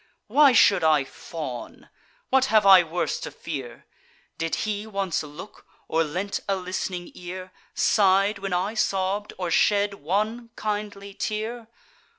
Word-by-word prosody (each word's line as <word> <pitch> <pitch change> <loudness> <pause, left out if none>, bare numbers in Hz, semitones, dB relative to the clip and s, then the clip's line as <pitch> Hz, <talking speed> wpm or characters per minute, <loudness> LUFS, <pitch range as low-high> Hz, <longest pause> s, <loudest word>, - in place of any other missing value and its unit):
Why 290 -2 +5
should 195 -7 +5
I 155 -3 +4
fawn? 135 -2 -8 0.4
what 265 0 +4
have 215 -5 +3
I 190 -2 +9
worse 175 +1 -2
to - - -6
fear? 135 -7 -7 0.5
Did 165 0 -1
he 210 0 -3
once 195 -4 -1
look, 155 +6 -11 0.2
or 165 +1 +2
lent 180 +6 -3
a 195 - +2
list'ning 180 -1 -4
ear, 185 +1 -8 0.2
Sigh'd 200 0 +3
when 195 -1 -4
I 185 +4 0
sobb'd, 200 -1 -1
or 180 -2 -3
shed 205 +3 +3
one 215 +7 -2
kindly 205 -2 -4
tear? 220 +3 -4
195 Hz, 140 wpm, -25 LUFS, 175-210 Hz, 0.5 s, I